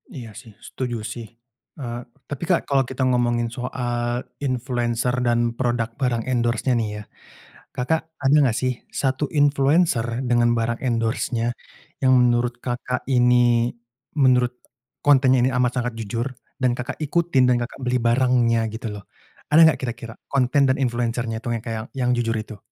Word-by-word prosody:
Iya 120 -5 -7
sih 115 -4 -16
setuju 125 -3 -4
sih, 115 -1 -7 0.5
eee, 120 -3 -5 0.3
tapi 145 +1 -5
Kak, 175 - +3
kalau 135 -1 +3
kita 130 0 -2
ngomongin 120 -1 +1
soal 120 0 -3 0.2
influencer 125 -2 -1
dan 120 0 +2
product 120 -2 -1
barang 120 -4 0
endorse-nya 120 +1 +1
nih 110 -2 -1
ya, - - -11 0.7
Kakak, 155 +6 0 0.2
ada 135 +2 +4
enggak 130 -6 +3
sih 130 0 +1 0.2
1 135 +1 0
influencer 145 -2 +3 0.2
dengan 120 -1 +3
barang 115 0 0
endorse-nya 115 0 -1 0.5
yang 130 0 +5
menurut 120 0 +1
Kakak, 125 0 -3
ini, 120 -1 +3 0.5
menurut 125 -2 +4 0.5
kontennya 130 -2 +5
ini 125 - +3
amat 125 0 +2
sangat 120 0 -3
jujur 115 +3 -3 0.3
dan 125 -1 +3
Kakak, 125 - -5
ikutin 150 -4 +2
dan 125 - +3
Kakak, 120 - -6
beli 125 0 +1
barangnya 120 -1 +2
gitu 110 0 -6
loh. 100 -1 -9 0.5
Ada 155 +2 +5
enggak 160 - +4
kira-kira, 120 -2 -5 0.2
konten 140 +1 +2
dan 130 - +2
influencer-nya 120 -3 -1
itu - - -8
yang 115 - -5
kayak 110 -2 -3
yang 125 -1 +1
jujur 115 -2 0
itu? 110 0 -7
125 Hz, 155 wpm, -23 LUFS, 120-130 Hz, 0.7 s, yang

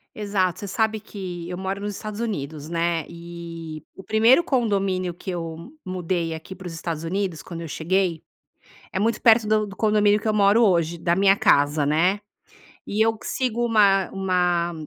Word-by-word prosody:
Exato. 195 -4 -1
Você 205 - -6
sabe 220 +1 0
que 180 -5 -7
eu 180 - -5
moro 190 +1 -3
nos 205 -1 -4
Estados 215 0 -6
Unidos, 155 -9 -4
né, 170 -1 0
e 170 -2 -8
o 190 - -11
1º 225 - +4
condomínio 195 - 0
que 175 - -9
eu 165 - -6
mudei 175 -2 -2
aqui 160 +4 -8
para 185 -1 -9
os 165 - -7
Estados 165 -1 -4
Unidos 185 -2 -2
quando 170 -2 -8
eu 165 - -6
cheguei, 175 +1 0 0.7
é - - -1
muito 225 +3 0
perto 230 -2 +6
do 215 0 +2
do 195 - -10
condomínio 210 -1 +3
que - - -8
eu 215 - +2
moro 205 +3 +4
hoje, 170 -4 +2
da 170 +1 +1
minha 195 +1 +4
casa, 145 -3 +3
né. 175 +7 +2 0.7
E 210 +2 -1
eu 225 -1 +1
q - - -14
sigo 240 -2 -1
uma 200 -4 +4
uma 180 -3 0
190 Hz, 180 wpm, -23 LUFS, 170-210 Hz, 0.7 s, perto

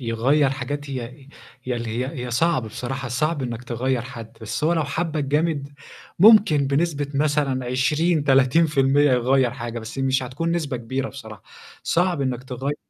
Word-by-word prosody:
يغيّر 130 +4 +2
حاجات 140 +2 -5
هي 130 +1 -7 0.4
ي 125 - -1
اللي 115 -1 -4
هي 130 0 -4
هي - - -6
صعب 160 +3 +1
بصراحة، 125 +4 -5
صعب 150 +4 -1
إنّك 120 -1 -5
تغيّر 125 +1 -1
حد، 115 -2 -10
بس 110 +7 -3
هو 165 - +3
لو 160 -3 +1
حَبّك 155 +1 -2
جامد 145 0 0 0.5
ممكن 200 -8 +6
بنسبة 145 +1 0
مثلًا 140 -3 0
20، 150 +5 +1
30% 135 0 +3
يغيّر 125 +1 +2
حاجة 120 -2 -6
بس 110 +4 -8
مش 135 0 +1
هتكون 145 +7 -3
نسبة 155 -6 -2
كبيرة 130 +3 -3
بصراحة. 110 -7 -11 0.4
صعب 175 -2 +1
إنّك 125 -2 -2
تغيّر 130 +2 -3
135 Hz, 160 wpm, -23 LUFS, 125-150 Hz, 0.5 s, ممكن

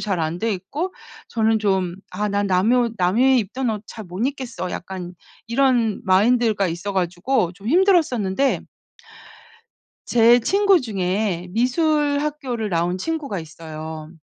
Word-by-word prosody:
잘 195 -4 -1
안 160 +2 -2
되어 225 +4 -1
있고 275 - -3 0.4
저는 220 -1 +2
좀 190 -4 0 0.2
'아 210 +3 -2
난 200 0 0
남의 200 +7 +3
옷 235 -2 +1
남이 240 +9 +4
입던 235 +4 -2
옷 210 -2 -4
잘 220 -2 -9
못 185 +8 -2
입겠어.' 245 -9 -5
약간 180 -1 -6 0.3
이런 235 -3 +2
마인드가 210 +1 +3
있어 175 +5 -4
가지고 180 +2 0
좀 200 +4 -8
힘들었었는데 280 - +2 1.4
제 240 +1 +5
친구 395 - +3
중에 190 -4 -2
미술 285 - +1
학교를 265 -8 -3
나온 175 +1 0
친구가 295 - -3
있어요. 155 -1 -8
215 Hz, 260 characters per minute, -22 LUFS, 185-255 Hz, 1.4 s, 제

